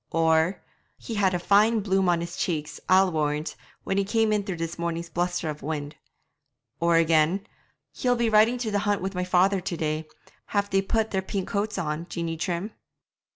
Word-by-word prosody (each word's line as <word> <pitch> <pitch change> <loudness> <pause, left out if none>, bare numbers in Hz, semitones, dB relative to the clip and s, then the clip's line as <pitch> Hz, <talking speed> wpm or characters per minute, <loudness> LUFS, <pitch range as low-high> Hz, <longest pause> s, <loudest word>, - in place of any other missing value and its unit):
Or: 160 +2 +2 0.3
'He 235 - -7
had 195 -3 +2
a - - +2
fine 210 +5 +3
bloom 190 -2 +1
on 170 -1 +2
his 170 +1 -5
cheeks, 155 -3 -3
I'll 185 0 +5
warrant, 150 -1 -1 0.3
when 195 - 0
he - - +2
came 220 +1 +1
in 210 -1 +1
through 195 -3 -4
this 165 0 -4
morning's 170 0 -3
bluster 175 0 -1
of 150 -1 -5
wind.' 150 -1 -4 0.8
Or 170 0 +3
again: 165 +4 +3 0.5
'He'll 245 -1 +1
be 235 -1 +1
riding 220 +3 +4
to 235 -3 -3
the 205 - +1
hunt 205 -3 0
with 190 +1 -2
my 180 -1 -2
father 185 +2 +3
to 180 -2 -4
day; 155 0 -2 0.4
have 205 0 -1
they 195 0 +3
put 220 +2 -1
their 190 - 0
pink 190 0 -4
coats 205 +1 -1
on, 160 -1 -3
Jeanie 170 -1 -3
Trim?' 180 +4 -2
180 Hz, 195 wpm, -26 LUFS, 165-205 Hz, 0.8 s, I'll